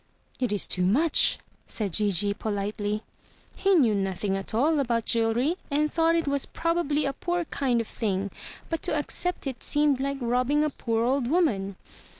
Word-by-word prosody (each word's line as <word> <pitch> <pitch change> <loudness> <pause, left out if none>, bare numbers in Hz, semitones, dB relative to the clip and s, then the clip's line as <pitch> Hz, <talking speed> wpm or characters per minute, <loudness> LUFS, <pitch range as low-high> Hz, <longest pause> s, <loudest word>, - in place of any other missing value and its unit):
"It 250 -4 0
is 205 - +1
too 180 -1 +1
much," 290 - +3 0.3
said 205 -6 -2
Gigi 205 0 +2
politely. 210 0 -3 0.5
He 390 0 +3
knew 250 -10 +4
nothing 195 0 -1
at 195 0 -5
all 295 +7 +2
about 235 -4 0
jewelry 235 +8 +1
and 300 +1 +1
thought 330 0 +3
it 330 -2 0
was 280 -1 +1
probably 335 -3 0
a 275 - -1
poor 350 +2 -2
kind 260 -5 0
of 230 - -3
thing; 200 -3 -2 0.4
but 330 - -3
to 305 - 0
accept 355 +4 -1
it 265 -3 -5
seemed 290 -2 +2
like 275 +1 -2
robbing 250 +4 +1
a 305 - 0
poor 230 -3 -1
old 260 0 +1
woman. 215 - +1
250 Hz, 170 wpm, -26 LUFS, 210-300 Hz, 0.5 s, knew